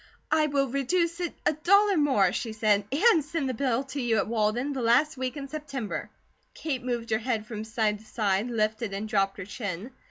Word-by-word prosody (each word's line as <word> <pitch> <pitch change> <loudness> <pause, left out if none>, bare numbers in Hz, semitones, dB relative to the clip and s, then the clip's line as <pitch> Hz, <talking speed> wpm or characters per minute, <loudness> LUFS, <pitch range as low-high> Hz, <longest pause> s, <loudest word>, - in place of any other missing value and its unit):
"I 310 0 +4
will 280 -1 +1
reduce 335 +7 0
it 350 -2 -3
a - - +4
dollar 400 +6 +4
more," 265 - +3
she 225 -3 -3
said, 210 -2 +2
"and 330 - +4
send 300 -1 -2
the 260 - -1
bill 255 +1 0
to 285 - -2
you 235 -2 +1
at 195 - +1
Walden 230 +5 0
the 265 - -3
last 250 +7 +3
week 260 +2 -3
of 275 -1 -7
September." 280 -7 -4 0.5
Kate 270 -6 -3
moved 240 -2 -3
her 220 - +2
head 225 -2 -2
from 215 -1 -6
side 220 -1 0
to 220 - -18
side, 210 0 0
lifted 215 -2 -1
and 210 +2 -4
dropped 195 -2 +1
her 195 - -6
chin. 200 +1 -5
245 Hz, 210 wpm, -27 LUFS, 215-285 Hz, 0.5 s, I